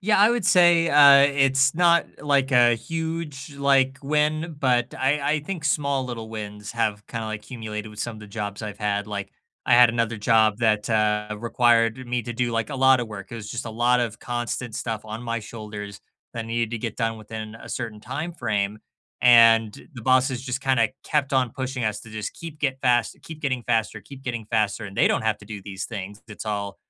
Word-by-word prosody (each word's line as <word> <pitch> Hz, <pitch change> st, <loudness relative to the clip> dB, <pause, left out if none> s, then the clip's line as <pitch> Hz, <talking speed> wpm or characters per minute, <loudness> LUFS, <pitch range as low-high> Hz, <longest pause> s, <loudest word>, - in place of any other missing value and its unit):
Yeah, 210 Hz, +2 st, +2 dB
I 210 Hz, +3 st, +6 dB
would 240 Hz, -4 st, -1 dB
say, 175 Hz, -2 st, +5 dB
uh, 140 Hz, -1 st, +7 dB
it's 135 Hz, 0 st, +3 dB
not, 170 Hz, -1 st, +4 dB, 0.2 s
like, 140 Hz, -2 st, +1 dB
a 120 Hz, -2 st, +5 dB
huge, 160 Hz, 0 st, -5 dB
like, 135 Hz, -1 st, +2 dB
win, 150 Hz, +2 st, 0 dB
but 125 Hz, -2 st, +1 dB
I 140 Hz, +3 st, +1 dB
I 150 Hz, -, -1 dB
think 160 Hz, +1 st, -6 dB
small 140 Hz, -3 st, 0 dB
little 115 Hz, -3 st, -6 dB
wins 105 Hz, -1 st, -7 dB
have 105 Hz, -3 st, -2 dB
kinda, 115 Hz, -2 st, -5 dB
like, 110 Hz, -1 st, -4 dB
accumulated 110 Hz, -2 st, -6 dB
with 105 Hz, 0 st, -9 dB
some 120 Hz, -1 st, -4 dB
of 110 Hz, -, -12 dB
the 105 Hz, -, -10 dB
jobs 105 Hz, 0 st, -5 dB
I've 105 Hz, -1 st, -6 dB
had, 105 Hz, -1 st, -1 dB
like, 100 Hz, -2 st, -5 dB, 0.3 s
I -, -, +4 dB
had 120 Hz, -1 st, +7 dB
another 115 Hz, -1 st, -1 dB
job 110 Hz, 0 st, +3 dB
that, 110 Hz, -2 st, +1 dB
uh, 105 Hz, -1 st, +1 dB
required 120 Hz, +1 st, +2 dB
me 125 Hz, 0 st, -1 dB
to 120 Hz, -, -5 dB
do, 120 Hz, +1 st, -1 dB
like, 115 Hz, -1 st, -1 dB
a 145 Hz, -, -5 dB
lot 130 Hz, 0 st, +5 dB
of 120 Hz, -, -2 dB
work, 105 Hz, -3 st, -9 dB
it 115 Hz, -, -6 dB
was 105 Hz, -2 st, -8 dB
just 120 Hz, -, -5 dB
a 115 Hz, -, -6 dB
lot 120 Hz, +2 st, +2 dB
of 115 Hz, -2 st, -3 dB
constant 120 Hz, -1 st, -4 dB
stuff 110 Hz, -3 st, -4 dB
on 110 Hz, +2 st, -7 dB
my 115 Hz, -1 st, -2 dB
shoulders 105 Hz, -2 st, -8 dB, 0.3 s
that 115 Hz, -1 st, -4 dB
needed 115 Hz, 0 st, -1 dB
to 115 Hz, -, -2 dB
get 110 Hz, -1 st, -5 dB
done 115 Hz, -1 st, -1 dB
within 110 Hz, 0 st, -8 dB
a 115 Hz, -, -12 dB
certain 110 Hz, -4 st, -5 dB
timeframe, 110 Hz, -9 st, -3 dB, 0.4 s
and 115 Hz, -3 st, +5 dB
the 120 Hz, -, -9 dB
bosses 130 Hz, 0 st, +2 dB
just 130 Hz, 0 st, -3 dB
kinda 130 Hz, -5 st, +2 dB, 0.2 s
kept 145 Hz, -3 st, 0 dB
on 130 Hz, -4 st, +1 dB
pushing 130 Hz, -2 st, -4 dB
us 105 Hz, -1 st, -2 dB
to 115 Hz, -, -13 dB
just 110 Hz, -1 st, -5 dB
keep 160 Hz, -2 st, -9 dB
get 135 Hz, -3 st, -1 dB
fast 120 Hz, -4 st, +2 dB
keep 160 Hz, -1 st, -9 dB
getting 130 Hz, -4 st, -1 dB
faster, 110 Hz, -2 st, -1 dB
keep 135 Hz, +6 st, -13 dB
getting 115 Hz, -4 st, -4 dB
faster, 110 Hz, -1 st, 0 dB
and 100 Hz, -1 st, -9 dB
they -, -, +4 dB
don't -, -, +1 dB
have 110 Hz, -1 st, 0 dB
to -, -, -15 dB
do 105 Hz, -3 st, -8 dB
these 95 Hz, -1 st, -6 dB
things, 105 Hz, -2 st, -7 dB
it's 110 Hz, -1 st, -9 dB
all, 100 Hz, -2 st, -3 dB
115 Hz, 215 wpm, -24 LUFS, 110-135 Hz, 0.4 s, uh